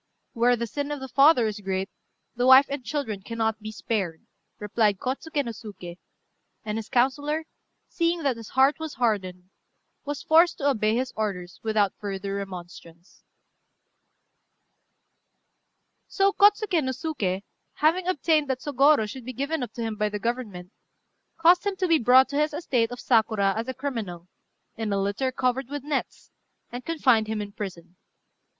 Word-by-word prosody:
"Where 240 Hz, +1 st, +3 dB
the 235 Hz, 0 st, -3 dB
sin 285 Hz, +5 st, -4 dB
of 295 Hz, -1 st, -4 dB
the 265 Hz, -, -6 dB
father 275 Hz, 0 st, +5 dB
is 215 Hz, -1 st, -3 dB
great, 190 Hz, -1 st, -2 dB, 0.5 s
the 245 Hz, +1 st, +1 dB
wife 260 Hz, +2 st, +9 dB
and 280 Hz, -2 st, -4 dB
children 235 Hz, -7 st, -3 dB
cannot 225 Hz, +1 st, -2 dB
be 215 Hz, 0 st, -6 dB
spared," 195 Hz, -7 st, -3 dB, 0.3 s
replied 210 Hz, -1 st, +1 dB
Kôtsuké 280 Hz, -, -3 dB
no 235 Hz, -, -3 dB
Suké; 200 Hz, -6 st, -10 dB, 0.7 s
and 215 Hz, +1 st, -2 dB
his 220 Hz, -, -8 dB
councillor, 290 Hz, +5 st, +1 dB, 0.4 s
seeing 335 Hz, -1 st, -1 dB
that 275 Hz, -3 st, +1 dB
his 230 Hz, -2 st, -10 dB
heart 270 Hz, +4 st, +4 dB
was 315 Hz, -2 st, -6 dB
hardened, 185 Hz, -6 st, -2 dB, 0.5 s
was 290 Hz, 0 st, -5 dB
forced 335 Hz, +2 st, +4 dB
to 285 Hz, -, -1 dB
obey 215 Hz, -5 st, +2 dB
his 255 Hz, +1 st, -2 dB
orders 185 Hz, -5 st, -4 dB
without 210 Hz, -3 st, +1 dB
further 195 Hz, -1 st, -4 dB
remonstrance. 175 Hz, -3 st, -9 dB, 2.9 s
So 395 Hz, 0 st, +2 dB
Kôtsuké 405 Hz, -5 st, +4 dB
no 260 Hz, 0 st, -1 dB
Suké, 215 Hz, -, -3 dB, 0.3 s
having 340 Hz, +5 st, +1 dB
obtained 310 Hz, -4 st, +1 dB
that 260 Hz, -1 st, -1 dB
Sôgorô 285 Hz, -4 st, +3 dB
should 255 Hz, +4 st, -8 dB
be 255 Hz, +2 st, -6 dB
given 280 Hz, +5 st, -2 dB
up 245 Hz, -, -4 dB
to 235 Hz, -, -5 dB
him 220 Hz, -1 st, -3 dB
by 210 Hz, 0 st, 0 dB
the 210 Hz, -, -4 dB
Government, 210 Hz, -6 st, -4 dB, 0.7 s
caused 345 Hz, +3 st, +5 dB
him 405 Hz, -1 st, -1 dB
to 370 Hz, -1 st, -1 dB
be 330 Hz, -2 st, +4 dB
brought 255 Hz, +3 st, +6 dB
to 285 Hz, +1 st, -1 dB
his 300 Hz, 0 st, 0 dB
estate 250 Hz, -8 st, 0 dB
of 245 Hz, 0 st, -8 dB
Sakura 220 Hz, -4 st, +2 dB
as 225 Hz, +2 st, -3 dB
a 260 Hz, -, -3 dB
criminal, 215 Hz, -11 st, -5 dB, 0.5 s
in 220 Hz, -2 st, -3 dB
a 200 Hz, -, +1 dB
litter 205 Hz, +7 st, -1 dB
covered 255 Hz, 0 st, -1 dB
with 290 Hz, -1 st, -5 dB
nets, 290 Hz, -2 st, -4 dB, 0.4 s
and 245 Hz, +1 st, -6 dB
confined 255 Hz, -9 st, +2 dB
him 220 Hz, 0 st, -2 dB
in 205 Hz, -1 st, -5 dB
prison. 180 Hz, -4 st, -8 dB
240 Hz, 165 wpm, -25 LUFS, 210-285 Hz, 2.9 s, wife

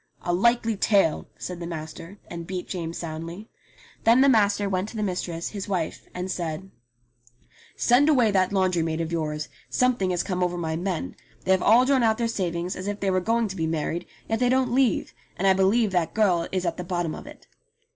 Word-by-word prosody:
"A 175 Hz, -, 0 dB
likely 230 Hz, +3 st, +2 dB
tale," 195 Hz, -5 st, +2 dB
said 180 Hz, -1 st, -6 dB
the 170 Hz, -, -5 dB
master, 165 Hz, +3 st, -7 dB
and 170 Hz, -1 st, -7 dB
beat 185 Hz, -1 st, -4 dB
James 170 Hz, -3 st, -4 dB
soundly. 170 Hz, +5 st, -6 dB, 0.5 s
Then 235 Hz, +3 st, +6 dB
the 275 Hz, -, +6 dB
master 205 Hz, -4 st, +3 dB
went 190 Hz, +1 st, -1 dB
to -, -, -11 dB
the 215 Hz, -, -1 dB
mistress, 180 Hz, -3 st, -3 dB
his 200 Hz, -3 st, -6 dB
wife, 175 Hz, -5 st, -3 dB
and 180 Hz, +1 st, -4 dB
said: 175 Hz, +2 st, -4 dB, 1.0 s
"Send 260 Hz, +5 st, +4 dB
away 245 Hz, -8 st, +4 dB
that 185 Hz, -1 st, +2 dB
laundry 185 Hz, -3 st, +2 dB
maid 160 Hz, 0 st, -1 dB
of 165 Hz, 0 st, -2 dB
yours. 155 Hz, -2 st, -2 dB, 0.2 s
Something 250 Hz, -7 st, +2 dB
has 180 Hz, -1 st, 0 dB
come 180 Hz, -1 st, -2 dB
over 180 Hz, 0 st, 0 dB
my 160 Hz, -2 st, -2 dB
men. 170 Hz, -, -3 dB, 0.3 s
They 190 Hz, -, +2 dB
have 190 Hz, -1 st, +4 dB
all 235 Hz, +4 st, +6 dB
drawn 270 Hz, -1 st, +3 dB
out 220 Hz, -1 st, +3 dB
their 235 Hz, -, 0 dB
savings 180 Hz, -5 st, -2 dB
as 185 Hz, +2 st, -6 dB
if 205 Hz, 0 st, -3 dB
they 195 Hz, -1 st, 0 dB
were 185 Hz, 0 st, +1 dB
going 230 Hz, +4 st, +1 dB
to 190 Hz, -, -6 dB
be 160 Hz, -3 st, -1 dB
married, 160 Hz, +1 st, -2 dB, 0.2 s
yet 225 Hz, 0 st, 0 dB
they 245 Hz, -, +3 dB
don't 255 Hz, -1 st, +2 dB
leave, 255 Hz, -5 st, +2 dB, 0.2 s
and 195 Hz, -, -1 dB
I 190 Hz, -, +7 dB
believe 195 Hz, +3 st, +3 dB
that 170 Hz, -3 st, 0 dB
girl 180 Hz, -6 st, +2 dB
is 185 Hz, -1 st, -1 dB
at 170 Hz, -1 st, -1 dB
the 180 Hz, -, -4 dB
bottom 175 Hz, -3 st, -2 dB
of -, -, -9 dB
it." -, -, -13 dB
185 Hz, 215 wpm, -25 LUFS, 170-220 Hz, 1.0 s, I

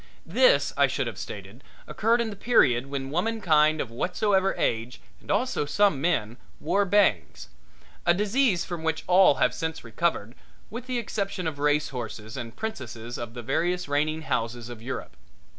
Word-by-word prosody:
This, -, -, +3 dB
I -, -, +4 dB
should -, -, -2 dB
have -, -, -6 dB
stated, -, -, -8 dB, 0.2 s
occurred 230 Hz, +2 st, +1 dB
in 225 Hz, -2 st, -2 dB
the -, -, -7 dB
period 135 Hz, -, +3 dB
when 135 Hz, -1 st, -4 dB
womankind 160 Hz, -5 st, +2 dB
of 120 Hz, -, -3 dB
whatsoever 190 Hz, -, +1 dB
age 115 Hz, +2 st, -1 dB, 0.2 s
and -, -, -20 dB
also 210 Hz, -, 0 dB
some 200 Hz, -4 st, +2 dB
men 120 Hz, -9 st, 0 dB, 0.2 s
wore 200 Hz, +6 st, +1 dB
bangs, 180 Hz, -, +1 dB, 0.5 s
a 175 Hz, -, +4 dB
disease 210 Hz, +1 st, +2 dB
from 175 Hz, -3 st, -5 dB
which 160 Hz, 0 st, -1 dB
all 185 Hz, +1 st, +6 dB
have -, -, +2 dB
since 160 Hz, -1 st, -4 dB
recovered 115 Hz, -1 st, -1 dB, 0.4 s
with 235 Hz, +3 st, -7 dB
the 255 Hz, -1 st, -1 dB
exception 200 Hz, -5 st, -3 dB
of 155 Hz, -3 st, -3 dB
racehorses 125 Hz, -7 st, -2 dB
and 120 Hz, -3 st, -6 dB
princesses 120 Hz, -, -6 dB
of 120 Hz, 0 st, -7 dB
the 120 Hz, -, -6 dB
various 175 Hz, +8 st, 0 dB
reigning 155 Hz, +2 st, 0 dB
houses 115 Hz, -3 st, -2 dB
of 120 Hz, -2 st, -9 dB
Europe. 130 Hz, +3 st, -6 dB
160 Hz, 160 wpm, -26 LUFS, 120-200 Hz, 0.5 s, all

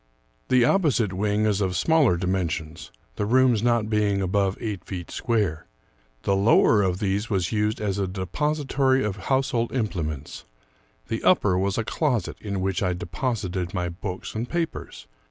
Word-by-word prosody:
The 125 Hz, -2 st, +4 dB
opposite 130 Hz, -, +2 dB
wing 105 Hz, +2 st, 0 dB
is 105 Hz, -1 st, +1 dB
of 95 Hz, -2 st, 0 dB
smaller 145 Hz, -, +3 dB
dimensions, 85 Hz, -3 st, -2 dB, 0.3 s
the 105 Hz, -, 0 dB
rooms 125 Hz, -2 st, +4 dB
not 120 Hz, -2 st, +2 dB
being 105 Hz, -2 st, +1 dB
above 95 Hz, +1 st, 0 dB
eight 105 Hz, -4 st, -4 dB
feet 90 Hz, -3 st, -7 dB
square. 105 Hz, -10 st, -1 dB, 0.6 s
The 100 Hz, -, +2 dB
lower 105 Hz, +1 st, +4 dB
of 90 Hz, -2 st, 0 dB
these 100 Hz, +2 st, -1 dB
was 95 Hz, -5 st, 0 dB
used 105 Hz, 0 st, 0 dB
as 100 Hz, -2 st, -1 dB
a 100 Hz, -, 0 dB
depository 135 Hz, -, 0 dB
of 105 Hz, -2 st, -2 dB
household 130 Hz, -3 st, +1 dB
implements; 80 Hz, -, -3 dB, 0.6 s
the 115 Hz, -, -3 dB
upper 105 Hz, -, +4 dB
was 95 Hz, +1 st, 0 dB
a 115 Hz, -, 0 dB
closet 125 Hz, -, -1 dB
in 100 Hz, -3 st, -3 dB
which 95 Hz, -1 st, -1 dB
I 90 Hz, -2 st, +1 dB
deposited 95 Hz, -1 st, -3 dB
my 90 Hz, -1 st, -1 dB
books 90 Hz, +2 st, -6 dB
and 115 Hz, +3 st, -4 dB
papers. 170 Hz, -1 st, -4 dB
105 Hz, 155 wpm, -25 LUFS, 95-120 Hz, 0.6 s, The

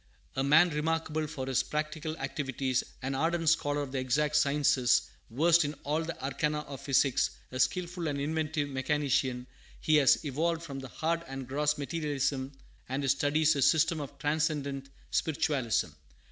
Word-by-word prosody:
A 135 Hz, -, 0 dB
man 160 Hz, +5 st, +5 dB
remarkable 155 Hz, 0 st, -1 dB
for 130 Hz, -3 st, -5 dB
his 130 Hz, -1 st, +1 dB
practical 155 Hz, +1 st, -3 dB
activities, 135 Hz, -2 st, -2 dB, 0.2 s
an 135 Hz, +1 st, -2 dB
ardent 165 Hz, +3 st, +1 dB
scholar 145 Hz, -3 st, +1 dB
of 135 Hz, -, -7 dB
the 135 Hz, -, -2 dB
exact 150 Hz, +4 st, 0 dB
sciences, 140 Hz, -4 st, +3 dB, 0.3 s
versed 165 Hz, +8 st, +4 dB
in 145 Hz, +1 st, -3 dB
all 150 Hz, +3 st, 0 dB
the 165 Hz, +1 st, -6 dB
arcana 150 Hz, +3 st, -1 dB
of 140 Hz, -3 st, -9 dB
physics, 135 Hz, 0 st, +2 dB, 0.2 s
a 130 Hz, -, -5 dB
skilful 175 Hz, +3 st, 0 dB
and 145 Hz, -2 st, -2 dB
inventive 155 Hz, 0 st, -1 dB
mechanician, 135 Hz, -2 st, 0 dB, 0.3 s
he 155 Hz, -1 st, +3 dB
has 145 Hz, +2 st, +4 dB
evolved 165 Hz, +4 st, -1 dB
from 140 Hz, -5 st, -6 dB
the 135 Hz, -, -7 dB
hard 165 Hz, +5 st, -1 dB
and 135 Hz, -1 st, -6 dB
gross 150 Hz, +3 st, 0 dB
materialism 140 Hz, -3 st, -2 dB, 0.4 s
of 135 Hz, +2 st, -1 dB
his 135 Hz, -, +3 dB
studies 150 Hz, +3 st, +2 dB
a 140 Hz, -, -1 dB
system 160 Hz, +3 st, +3 dB
of 140 Hz, 0 st, -8 dB
transcendent 145 Hz, -2 st, -1 dB, 0.2 s
spiritualism. 140 Hz, -, 0 dB
145 Hz, 160 wpm, -30 LUFS, 135-155 Hz, 0.4 s, man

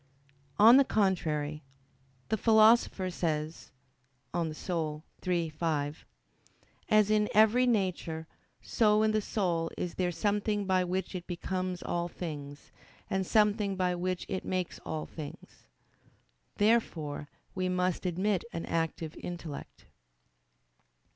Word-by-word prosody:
On 225 Hz, +5 st, +9 dB
the 275 Hz, -, +7 dB
contrary, 155 Hz, -, 0 dB, 0.7 s
The 220 Hz, -, +2 dB
Philosopher 220 Hz, -3 st, +4 dB
says 160 Hz, -2 st, -3 dB, 0.6 s
(De 175 Hz, -, 0 dB
Anima 160 Hz, -1 st, -2 dB, 0.3 s
iii, 170 Hz, -3 st, +1 dB
5), 150 Hz, -1 st, -2 dB, 0.8 s
"As 215 Hz, -1 st, +4 dB
in 210 Hz, -1 st, +3 dB
every 220 Hz, +4 st, +5 dB
nature, 185 Hz, -7 st, -1 dB, 0.4 s
so 215 Hz, -1 st, +3 dB
in 220 Hz, -, +3 dB
the 215 Hz, 0 st, +1 dB
soul 175 Hz, -6 st, -1 dB
is 175 Hz, -, -3 dB
there 180 Hz, -1 st, 0 dB
something 205 Hz, +2 st, 0 dB
by 185 Hz, -1 st, +2 dB
which 185 Hz, +2 st, -2 dB
it 180 Hz, -2 st, -6 dB
becomes 185 Hz, 0 st, -3 dB
all 175 Hz, 0 st, -1 dB
things, 145 Hz, -5 st, -7 dB, 0.4 s
and 190 Hz, -2 st, 0 dB
something 210 Hz, -2 st, +2 dB
by 180 Hz, -1 st, +1 dB
which 180 Hz, +1 st, -2 dB
it 190 Hz, -2 st, -3 dB
makes 185 Hz, -2 st, -3 dB
all 155 Hz, -1 st, -4 dB
things." 150 Hz, -, -10 dB, 0.9 s
Therefore 165 Hz, -10 st, +1 dB, 0.2 s
we 185 Hz, -1 st, -1 dB
must 180 Hz, 0 st, 0 dB
admit 185 Hz, +2 st, 0 dB
an 165 Hz, -, -4 dB
active 165 Hz, -1 st, -2 dB
intellect. 170 Hz, -4 st, -7 dB
180 Hz, 120 wpm, -30 LUFS, 165-210 Hz, 0.9 s, On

